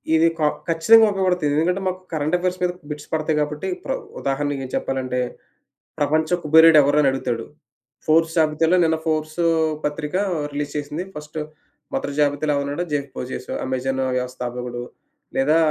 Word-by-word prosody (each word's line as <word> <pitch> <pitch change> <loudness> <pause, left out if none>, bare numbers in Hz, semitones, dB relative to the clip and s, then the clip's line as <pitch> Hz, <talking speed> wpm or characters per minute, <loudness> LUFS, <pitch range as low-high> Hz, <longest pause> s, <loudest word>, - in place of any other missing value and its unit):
ఇది 160 +1 +5
క - - -3 0.3
ఖచ్చితంగా 220 +8 +6
ఉపయోగపడతది. 185 -5 +1
ఎందుకంటే 180 +5 +1
మాకు 185 0 -2
కరెంట్ 155 +2 0
ఎఫేర్స్ 180 +1 -2
మీద 180 - +2 0.2
బిట్స్ 150 -1 -7
పడతాయి 155 -1 0
కాబట్టి 150 0 -3 0.2
ప్ర - - -4 0.3
ఉదాహరణకి 140 0 -1
ఏం - - -8
చెప్పాలంటే, 130 -1 -2 0.8
ప్రపంచ 155 +2 +1
కుబెరుడు 160 +1 +7
ఎవరని 145 +1 +3
అడుగుతాడు. 120 -3 -2 0.6
'ఫోర్స్' 165 +1 +2
జాబితలో 160 +2 +3
నిన్న 160 -1 +2
'ఫోర్స్' 155 0 -1 0.5
పత్రిక 150 +2 -3 0.4
రిలీజ్ 145 0 -4
చేసింది. 150 +3 -4
ఫస్ట్ 150 +1 -7 0.5
మొదర 145 - -2
జాబితాలో 145 +1 +2
ఎవరు 140 - 0
ఉన్నాడు? 145 +5 -2
'జెఫ్ 140 -1 -1
బెజోస్' 125 0 -6 0.2
'అమెజాన్' 130 +1 -1
వ్యవస్థాపకుడు. 125 -1 -4 0.5
లేదా 150 +4 +4
150 Hz, 140 wpm, -22 LUFS, 140-160 Hz, 0.8 s, కుబెరుడు